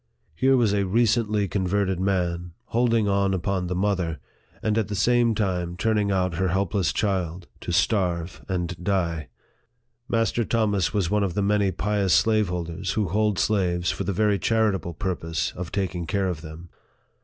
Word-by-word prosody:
Here 130 +11 +3
was 115 -5 +3
a 100 -2 +1
recently 110 -1 +2
converted 95 0 0
man, 90 -3 -1
hold 120 +2 +1
ing 110 -2 +2
on 100 -1 +2
upon 95 0 -1
the 90 - -2
mother, 90 -4 0 0.5
and 110 -1 +1
at 110 -3 +1
the 105 - -4
same 120 +2 +3
time 90 -4 -1
turning 105 0 +1
out 90 -3 0
her 95 +1 +1
helpless 95 0 0
child, 90 -4 -1
to - - -5
starve 90 -2 0
and 90 -1 -3
die! 85 -6 -1 0.8
Master 115 +1 +1
Thomas 105 -5 +1
was 100 -5 0
one 105 -1 +2
of 90 -3 -2
the 100 - +1
many 100 -1 +2
pious 100 0 +1
slaveholders 90 -7 0
who 105 -5 0
hold 105 +1 +1
slaves 90 -4 +1
for - - -3
the - - -1
very 105 +1 +2
charitable 100 -6 0
purpose 80 -3 -2
of 90 -2 -7
taking 90 -4 -2
care 100 0 0
of 85 -4 -4
them. 80 +2 -10
95 Hz, 165 wpm, -25 LUFS, 90-105 Hz, 0.8 s, Here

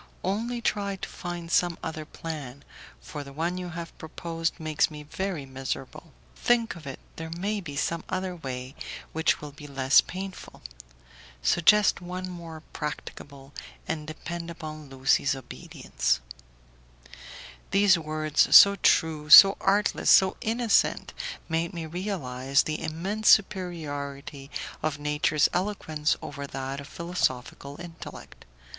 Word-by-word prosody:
Only 230 +6 -1
try 200 -3 -1
to 190 - -6
find 175 -1 -6
some 175 -1 +2
other 155 -1 -4
plan, 145 -5 -7 0.4
for 145 -2 -7
the 140 - -11
one 170 +5 -2
you 180 -1 -5
have 170 -1 -7
proposed 165 +1 -4
makes 155 -2 +1
me 150 -1 -9
very 175 -1 -4
miserable. 135 +4 -6 0.2
Think 235 -3 +1
of 160 -4 -11
it, 135 - -6 0.2
there 160 0 -6
may 200 +5 -2
be 145 -6 -7
some 165 +3 -1
other 185 -1 -2
way 130 -4 -6 0.4
which 160 0 +1
will 150 -1 -7
be 145 +1 -11
less 135 -1 +5
painful. 190 +1 -8 0.8
Suggest 200 - +4
one 180 +1 -5
more 165 -3 -9
practicable, 140 -2 -7 0.3
and 155 -1 -3
depend 170 +2 -6
upon 155 -3 -8
Lucie's 135 +1 +2
obedience." 130 - -2 1.5
These 195 -1 +5
words, 155 -1 +2
so 200 0 +10
true, 155 -4 +2
so 195 +5 +11
artless, 205 +1 +2
so 190 -1 +6
innocent, 230 0 +1 0.3
made 165 +1 -1
me 165 -1 -4
realize 145 -7 0
the 155 0 -3
immense 195 +7 -1
superiority 145 -8 0 0.3
of 155 -2 -1
nature's 150 0 +2
eloquence 170 -6 -1
over 140 -1 -6
that 135 0 -5
of 140 - -10
philosophical 145 -4 -3
intellect. 170 -2 -10
160 Hz, 130 wpm, -27 LUFS, 145-180 Hz, 1.5 s, so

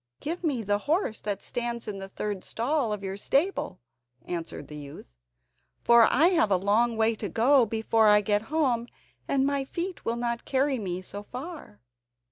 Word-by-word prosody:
"Give 340 +4 -4
me 275 -8 0
the 205 0 +1
horse 320 - 0
that 205 -2 -3
stands 235 -1 -3
in 200 -2 -4
the 195 0 -7
third 205 -1 -4
stall 250 0 -1
of 210 -1 -4
your 195 0 -4
stable," 275 - 0 0.5
answered 165 -4 -5
the 150 - -9
youth. 140 - -10 0.7
"For 235 -1 +6
I 315 +7 +5
have 325 - +3
a 190 - +4
long 220 +5 +2
way 225 +1 +3
to 210 -2 -5
go 240 - +4
before 220 0 +2
I 210 0 +6
get 205 0 +1
home, 260 -7 +1 0.4
and 270 -1 +2
my 280 -1 0
feet 345 +6 -5
will 230 - -1
not 235 0 -2
carry 270 -1 +1
me 185 -3 -4
so 200 +2 -7
far." 255 - -9
230 Hz, 180 wpm, -27 LUFS, 205-270 Hz, 0.7 s, For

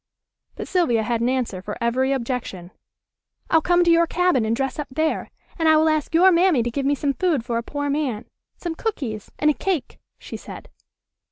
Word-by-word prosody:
But - - -6
Sylvia 245 -12 +1
had 235 +1 -1
an 240 - +2
answer 250 -8 -2
for 205 +2 -6
every 255 +3 +1
objection. 235 -9 -4 0.8
"I'll 320 - +5
come 350 +1 +3
to 340 - +4
your 335 0 +4
cabin 355 -10 +2
and 220 +1 0
dress 270 +3 -3
up 295 - -3
there, 315 +4 -1 0.3
and 325 -1 +3
I 315 - +6
will 315 +1 +4
ask 310 +1 -1
your 370 +3 +6
mammy 340 -7 +3
to 240 - -2
give 275 +2 -2
me 285 - +2
some 280 0 -1
food 315 -8 0
for 235 -2 -1
a - - -3
poor 285 +4 -4
man. 280 -7 -2 0.3
Some 345 -2 -4
cookies 270 - -4
and 300 0 +3
a - - -1
cake," 350 -3 -3 0.2
she - - -8
said. - - -11
280 Hz, 205 wpm, -22 LUFS, 235-325 Hz, 0.8 s, I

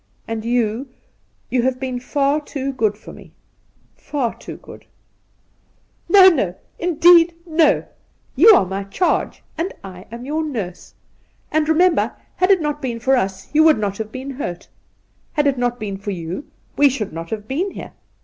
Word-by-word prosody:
And 225 -1 -4
you 235 +2 -1 0.3
— - - -42
you 250 - +2
have 255 +1 0
been 255 -2 -3
far 280 +3 0
too 275 -2 -4
good 220 -5 0
to - - -13
me - - -15 0.3
— - - -38
far 265 -6 -1
too - - -10
good,' - - -14 0.6
' - - -41
No, 390 -2 +8
no 245 - +2
— - - -40
indeed 340 0 +6
no! 320 -2 +3 0.5
You 345 - +7
are - - +3
my 190 +2 -4
charge, 275 - -1 0.2
and 350 +4 -1
I 185 -1 -10
am 235 +2 -8
your 310 +3 -1
nurse. 215 - -6 0.6
And, 310 0 +1
remember, 345 +2 +3 0.2
had 365 - +2
it 385 -3 +5
not 295 -1 -2
been 240 -3 -3
for 265 +3 +2
us 195 -3 -3
you 310 +1 +5
would 315 -4 +6
not 205 -1 -3
have 215 -1 -5
been 260 +1 -7
Kurt. 175 -11 -5 0.6
Had 295 -1 +1
it 275 -3 +1
not 245 0 -1
been 200 -3 -4
for 200 +1 -7
you 180 - -5 0.3
we 285 0 +5
should 225 -9 -4
not 165 +1 -6
have 215 -1 -5
been 330 - -1
here. - - -9
260 Hz, 185 wpm, -20 LUFS, 215-305 Hz, 0.6 s, No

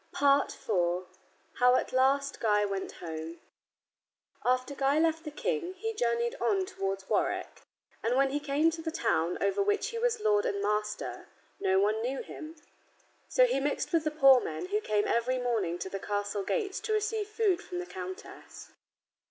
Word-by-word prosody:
IV 280 -4 +2 0.9
HOW 250 0 +6
AT - - -1
LAST 275 +2 +2
GUY 210 -2 +3
WENT 195 -1 -3
HOME 160 0 -7 1.0
After 255 +2 +1
Guy 275 +1 +1
left 325 0 +2
the 305 - -5
King, 375 +3 -2
he 450 +4 -3
journeyed 235 - 0
on 375 +11 +2
towards 195 - -4
Warwick. - - -1 0.4
And 235 +2 +1
when 270 0 +3
he 290 - 0
came 295 +3 +2
to 325 0 -6
the 325 - -3
town 175 - 0
over 200 - +1
which 415 +1 +1
he 465 - -4
was 470 -1 +1
lord 210 - +3
and 200 - -1
master 210 +1 -2 0.3
no 190 0 +2
one 210 +2 +2
knew 260 +3 -2
him. 315 +1 -9 0.7
So - - +5
he 480 - +1
mixed 285 +4 -2
with 330 -2 +3
the 310 - +1
poor 275 -4 +6
men 365 +8 -5
who 420 +2 0
came 210 - 0
every 245 +2 +1
morning 225 -9 -1
to 175 - -5
the 195 - -3
castle 205 0 -2
gates 400 - -1
to 435 +1 -2
receive 430 0 0
food 425 -4 +1
from 360 - -7
the 360 - -3
countess. 185 - -9
270 Hz, 175 wpm, -30 LUFS, -, 1.0 s, HOW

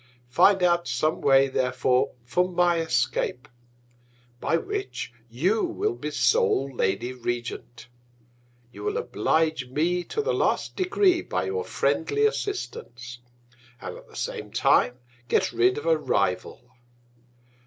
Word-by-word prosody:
Find 190 +8 +5
out 175 -1 +2
some 145 +6 0
Way 135 -1 +5
therefore 125 -1 0
for 180 +9 +1
my 175 -1 +2
Escape; 125 -2 -1 0.9
by 165 - +1
which 400 - -5 0.2
you 180 - +1
will 390 +4 -1
be - - -5
sole 450 - +2
Lady 110 +5 -1
Regent. 120 0 -5 0.8
You - - -10
will 420 +2 -1
oblige 160 - 0
me 170 +6 0
to 440 - -2
the - - 0
last - - 0
Degree, 370 -1 +2
by - - -2
your 445 +3 -2
friendly 430 -1 0
Assistance, 125 - -4 0.6
and 90 - -7
at - - -14
the - - -17
same - - -5
Time 125 - +3 0.3
get - - +1
rid 125 +2 +2
of 145 - -5
a 165 -1 +4
Rival. 110 -1 -1
155 Hz, 130 wpm, -25 LUFS, -, 0.9 s, Find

